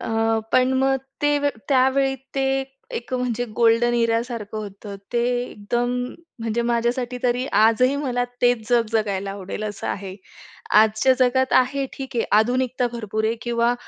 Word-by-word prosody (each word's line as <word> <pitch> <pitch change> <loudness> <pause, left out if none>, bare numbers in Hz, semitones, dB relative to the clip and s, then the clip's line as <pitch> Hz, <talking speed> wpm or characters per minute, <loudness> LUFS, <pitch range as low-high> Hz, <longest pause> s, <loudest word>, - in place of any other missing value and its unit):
अ, 225 0 0
पण 255 +1 +4
मग 270 0 +3 0.3
ते 290 0 +3 0.3
त्यावेळी, 270 0 +3 0.2
ते 270 0 +1 0.3
एक 240 - -7
म्हणजे 245 -1 -1
गोल्डन 235 +1 +3
इरासारखं 230 -2 -1
होतं. 200 -1 -8 0.2
ते 235 0 +1 0.2
एकदम 240 +2 -2 0.5
म्हणजे 230 +1 -1
माझ्यासाठी 240 +1 -1
तरी, 250 +1 +1
आजही 225 +6 +4
मला 250 -4 -1 0.2
तेच 245 -3 +2
जग 240 -2 +3
जगायला 200 -3 -1
आवडेल 195 +1 -6
असं 210 -1 -5
आहे. 195 -1 -4 0.7
आजच्या 220 +4 +3
जगात 260 +1 +2
आहे 270 +2 -1
ठीक 265 -2 -7
आहे 230 - +1
आधुनिकता 250 +2 +1
भरपूर 220 -2 -3
आहे, 220 +1 +1
किंवा 235 0 +1
240 Hz, 145 wpm, -22 LUFS, 220-255 Hz, 0.7 s, पण